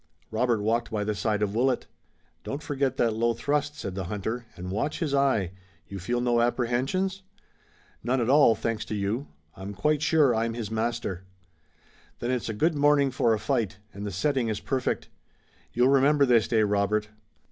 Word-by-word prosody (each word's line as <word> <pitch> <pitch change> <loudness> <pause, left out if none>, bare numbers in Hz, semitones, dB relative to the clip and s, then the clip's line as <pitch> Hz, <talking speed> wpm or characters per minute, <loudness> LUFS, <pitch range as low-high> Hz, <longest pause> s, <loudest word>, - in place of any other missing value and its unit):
Robert 110 -1 +1
walked 115 +2 0
by 105 -2 -2
the 105 +1 -1
side 105 0 0
of 100 -1 -1
Willet. 125 +2 +1 0.6
"Don't 140 +3 -5
forget 135 -2 -1
that 115 -2 +2
low 115 +1 +1
thrust," 145 +4 -1
said 95 - -5
the 95 -1 -4
hunter, 110 +5 -4
"and 90 +1 -6
watch 110 +9 -1
his 155 -5 -2
eye. 130 -10 +2 0.4
You 100 - -7
feel 120 +7 -1
no 120 -1 +2
apprehensions?" 130 +11 0 0.8
"None 125 +3 +1
at 115 - 0
all, 135 -4 +6
thanks 110 0 -2
to 105 - -4
you. 105 +7 -2 0.3
I'm 100 +1 -7
quite 150 +8 +1
sure 150 -4 +4
I'm 115 +1 -1
his 110 -3 -5
master." 110 -5 -2 0.9
"Then 120 - -2
it's 125 -3 -2
a - - -2
good 160 +10 +2
morning 145 -2 +3
for 115 -2 +2
a - - -5
fight, 115 -7 -1 0.2
and 100 - -7
the 105 - -3
setting 125 +6 0
is 110 -2 -2
perfect. 130 -2 -2 0.6
You'll 125 +2 +3
remember 140 +1 +4
this 120 -4 +4
day, 110 -2 +3
Robert. 105 +1 +1
120 Hz, 180 wpm, -27 LUFS, 105-135 Hz, 0.9 s, all